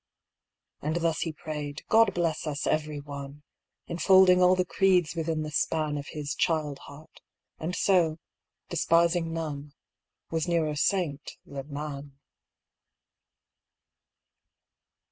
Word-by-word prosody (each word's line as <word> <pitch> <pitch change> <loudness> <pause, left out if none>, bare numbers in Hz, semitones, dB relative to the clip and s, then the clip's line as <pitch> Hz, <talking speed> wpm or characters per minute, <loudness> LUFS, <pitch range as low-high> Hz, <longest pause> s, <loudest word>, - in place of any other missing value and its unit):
And 155 +2 -2
thus 165 -2 0
he 165 - -1
prayed, 150 -3 -6
" - - -56
God 225 0 +4
bless 165 -2 -1
us 145 -1 -3
every 150 -1 -1
one!" 140 0 -8 0.4
Enfolding 185 +1 +5
all 180 +1 +6
the 185 0 +1
creeds 180 -3 +2
within 160 -1 -1
the 155 - -5
span 155 0 0
Of 145 0 -5
his 145 -2 -4
child 150 -4 0
heart; 145 +2 -14 0.4
and 170 +3 -3
so, 170 -5 +2 0.5
despising 170 0 +2
none, 150 -3 -5 0.6
Was 165 +1 -1
nearer 160 -3 +1
saint 155 -2 -1
than 140 +1 -8
man. 145 -1 -6
155 Hz, 120 wpm, -28 LUFS, 145-170 Hz, 0.6 s, all